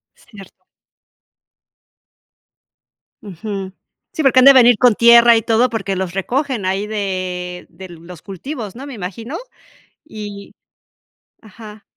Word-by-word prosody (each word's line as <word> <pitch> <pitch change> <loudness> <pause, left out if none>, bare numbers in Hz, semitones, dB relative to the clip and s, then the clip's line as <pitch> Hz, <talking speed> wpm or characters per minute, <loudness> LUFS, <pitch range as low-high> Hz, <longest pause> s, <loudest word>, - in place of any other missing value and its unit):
Cierto. 195 -4 -17 2.6
Ujú. 195 0 -7 0.4
Sí, 315 - -3
porque 270 -2 +3
han - - +4
de 275 - +9
venir 245 -3 +5
con 245 -3 +4
tierra 235 +1 +6
y 225 - 0
todo 230 +3 +2
porque 200 -4 -3
los 185 -2 -4
recogen 245 - -2
ahí 195 +2 -2
de 185 -4 -5
de 190 0 -12
los 170 -1 -13
cultivos, 215 - -8
¿no? 270 +3 -9
Me 280 - -9
imagino. 225 - -7 0.7
Y 205 -6 -10 0.9
Ajá. 215 0 -14
210 Hz, 120 wpm, -17 LUFS, 190-235 Hz, 2.6 s, de